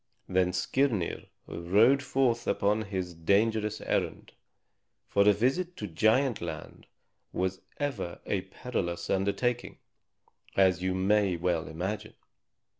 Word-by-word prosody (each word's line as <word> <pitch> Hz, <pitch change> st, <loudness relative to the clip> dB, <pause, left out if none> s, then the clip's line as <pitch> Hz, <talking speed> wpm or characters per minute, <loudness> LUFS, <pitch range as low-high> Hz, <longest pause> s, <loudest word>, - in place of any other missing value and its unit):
Then 90 Hz, -1 st, +2 dB
Skirnir 105 Hz, +1 st, 0 dB, 0.2 s
rode 105 Hz, +11 st, +3 dB
forth 130 Hz, -3 st, +1 dB
upon 105 Hz, +2 st, +1 dB
his 95 Hz, -3 st, -4 dB
dangerous 105 Hz, +5 st, +1 dB
errand; -, -, -2 dB, 0.8 s
for 100 Hz, +1 st, +4 dB
a -, -, +8 dB
visit 135 Hz, -, 0 dB
to 105 Hz, -, -4 dB
Giant 110 Hz, +7 st, +2 dB
Land 80 Hz, -3 st, -7 dB, 0.4 s
was 95 Hz, 0 st, -2 dB, 0.2 s
ever 120 Hz, -12 st, -3 dB
a 100 Hz, -, 0 dB
perilous 85 Hz, -4 st, -4 dB
undertaking, 100 Hz, +6 st, 0 dB, 0.8 s
as 95 Hz, -2 st, +4 dB
you 95 Hz, 0 st, 0 dB
may 100 Hz, 0 st, +2 dB
well 85 Hz, -1 st, 0 dB
imagine. 100 Hz, +7 st, -4 dB
100 Hz, 115 wpm, -29 LUFS, 90-115 Hz, 0.8 s, a